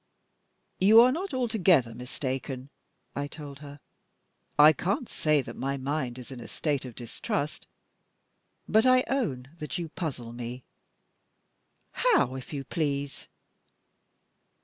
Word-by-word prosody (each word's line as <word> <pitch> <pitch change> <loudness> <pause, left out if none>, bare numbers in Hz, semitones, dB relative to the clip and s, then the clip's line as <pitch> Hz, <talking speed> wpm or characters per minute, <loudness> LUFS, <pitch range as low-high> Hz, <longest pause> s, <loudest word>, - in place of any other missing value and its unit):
"You 210 +4 +8
are 250 +1 +6
not 360 +8 -3
altogether 195 - +3
mistaken," 130 +2 -5 0.4
I 145 +1 -2
told 145 -2 -9
her. 145 0 -10 0.8
"I 150 +1 +9
can't 205 - -1
say 150 -3 +1
that - - -8
my 135 +1 -2
mind 135 -2 -2
is 125 +1 -10
in 130 - -7
a 115 - -8
state 145 -4 -1
of 125 -3 -9
distrust, 140 +4 -4 1.0
but 220 +1 +4
I 255 0 +6
own 140 - -1
that 150 -4 -4
you 170 -2 -4
puzzle 130 -9 -5
me." 120 +1 -6 1.3
"How, 450 - +3
if 130 -1 -8
you 140 -3 -4
please?" 140 -2 -2
145 Hz, 125 wpm, -28 LUFS, 130-185 Hz, 1.3 s, I